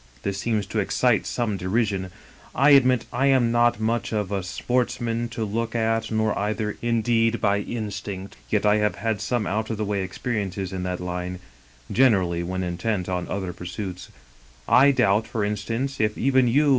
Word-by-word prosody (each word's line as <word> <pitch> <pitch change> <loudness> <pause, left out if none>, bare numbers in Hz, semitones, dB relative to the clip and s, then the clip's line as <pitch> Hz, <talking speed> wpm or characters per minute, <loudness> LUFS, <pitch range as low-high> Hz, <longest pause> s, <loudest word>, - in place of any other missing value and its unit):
This 100 0 -2
seems 110 -3 0
to 105 +3 -2
excite 115 +3 +2
some 110 -5 -1
derision. 95 0 -1 0.5
I 140 +3 +5
admit 130 -3 +5
I 135 +3 +2
am 130 -4 +4
not 120 -1 +3
much 115 +2 -1
of 105 -3 -2
a 100 -1 0
sportsman 120 +3 -1
to 115 -1 -3
look 115 +2 -3
at, 115 0 0
nor, 110 -1 +1 0.5
indeed, 115 -1 +1
by 100 0 +2
instinct, 100 -3 -5
yet 105 -1 +1
I 105 0 +5
have 105 -3 +1
had 110 +2 -2
some 120 -4 -1
out 105 +5 -2
of 110 - -2
the 105 - -1
way 100 -1 -1
experiences 95 -2 -3
in 95 - -3
that 90 -1 -3
line 90 0 -4 0.3
— - - -13
^gener 120 -8 +5
ally 85 -1 -2
when 95 +2 -3
intent 90 +2 -2
on 90 -1 -2
other 95 -2 -3
pursuits. 90 +1 -6 0.6
I 135 +3 +6
doubt, 115 -5 +2
for 110 -4 -1
instance, 115 +7 -3
if 105 -1 +1
even 130 -1 +3
you. 145 +5 +3
110 Hz, 180 wpm, -24 LUFS, 95-120 Hz, 0.6 s, I